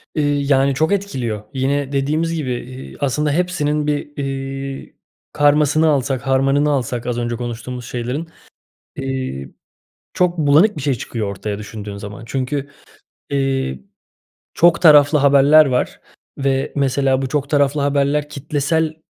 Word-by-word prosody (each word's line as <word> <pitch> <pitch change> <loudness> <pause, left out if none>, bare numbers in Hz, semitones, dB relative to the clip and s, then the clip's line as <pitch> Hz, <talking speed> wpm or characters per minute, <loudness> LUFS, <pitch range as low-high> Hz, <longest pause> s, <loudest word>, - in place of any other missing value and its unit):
Iıı, 150 - +1 0.3
yani, 135 0 +3
çok 160 +6 +1
etkiliyor. 130 - -3
Yine 135 +1 -1
dediğimiz 155 +4 0
gibi, 145 -6 -3
iii, 130 +2 -8
aslında 145 +2 0
hepsinin 150 -3 0
bir, 145 0 -3
iii, 135 0 -5 0.4
karmasını 150 +2 +3
alsak, 135 -3 0
harmanını 135 +2 +2
alsak 125 -4 -1
az 120 -1 -1
önce 120 0 -2
konuştuğumuz 120 +1 -6
şeylerin, 125 +7 -4 0.7
iii, 130 - -4 0.6
çok 180 -1 +1
bulanık 155 +7 +4
bir - - -4
şey 140 +1 +1
çıkıyor 115 -2 -4
ortaya 100 +1 -5
düşündüğün 105 -1 -7
zaman. 100 +2 -8
Çünkü, 135 +3 -3 0.6
iii, 135 - -1 0.7
çok 170 +1 +4
taraflı 150 -2 +7
haberler 145 +2 +6
var 125 -2 -1 0.4
ve, 135 -1 0
mesela, 135 -1 +1
bu 135 - -2
çok 145 0 -2
taraflı 145 0 +2
haberler 145 +1 +1
kitlesel 155 +3 -1
140 Hz, 130 wpm, -19 LUFS, 130-150 Hz, 0.7 s, taraflı